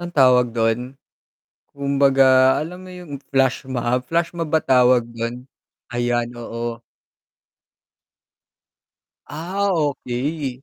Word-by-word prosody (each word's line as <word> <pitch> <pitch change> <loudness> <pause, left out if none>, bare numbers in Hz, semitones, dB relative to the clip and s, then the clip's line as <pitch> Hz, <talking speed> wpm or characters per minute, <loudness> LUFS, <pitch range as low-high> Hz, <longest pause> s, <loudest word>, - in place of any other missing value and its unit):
ang 175 0 -6
tawag 125 -5 +4
dun, 115 +3 -1 0.8
kumbaga 135 -2 +4
alam 180 +3 -7
mo - - -10
yung 180 -4 -11 0.2
flashmob, 130 -2 0
flashmob 170 0 -1
ba 160 0 +1
tawag 125 -2 +4
don? 115 +2 -5 0.5
Ayan, 120 0 -1
oo. 115 0 -5 2.5
Ah, 185 +7 -3
okey. 140 -2 -3
130 Hz, 90 wpm, -21 LUFS, 120-150 Hz, 2.5 s, tawag